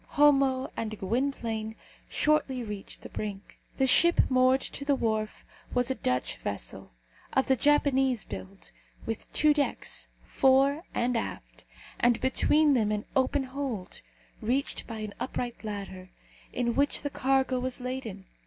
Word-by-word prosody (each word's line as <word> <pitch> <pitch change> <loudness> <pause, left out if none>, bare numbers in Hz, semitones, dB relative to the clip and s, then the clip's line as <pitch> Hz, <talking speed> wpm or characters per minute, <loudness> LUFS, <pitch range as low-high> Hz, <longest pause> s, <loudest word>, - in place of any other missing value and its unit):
Homo 275 -3 +4
and 215 -1 -4
Gwynplaine 225 0 -2 0.3
shortly 295 -5 +1
reached 210 -3 -7
the - - -8
brink. 205 -2 -6 0.2
The 265 - +3
ship 340 +6 +5
moored 255 +1 +4
to - - -5
the 280 0 +2
wharf 220 -3 -2 0.3
was 245 +1 +2
a - - +2
Dutch 125 - -1
vessel, - - -6 0.4
of 265 - +3
the 265 - +3
Japanese 270 -3 +3
build, 95 -1 -9 0.3
with 225 -1 -5
two 305 0 +4
decks, 290 -1 0 0.2
fore 275 +4 +3
and 245 +1 +1
aft, 230 - -5 0.3
and 240 -1 +3
between 295 +3 +3
them 220 -5 +2
an 210 0 -2
open 265 +1 +2
hold, 260 -7 -5 0.4
reached 255 +5 -1
by 225 -2 -6
an 210 -1 -5
upright 245 -2 -4
ladder, 195 -3 -6 0.4
in 240 -1 0
which 280 +3 +2
the 285 - -2
cargo 265 -1 +1
was 255 +1 -3
laden. 250 -6 -5
255 Hz, 145 wpm, -28 LUFS, 220-270 Hz, 0.4 s, ship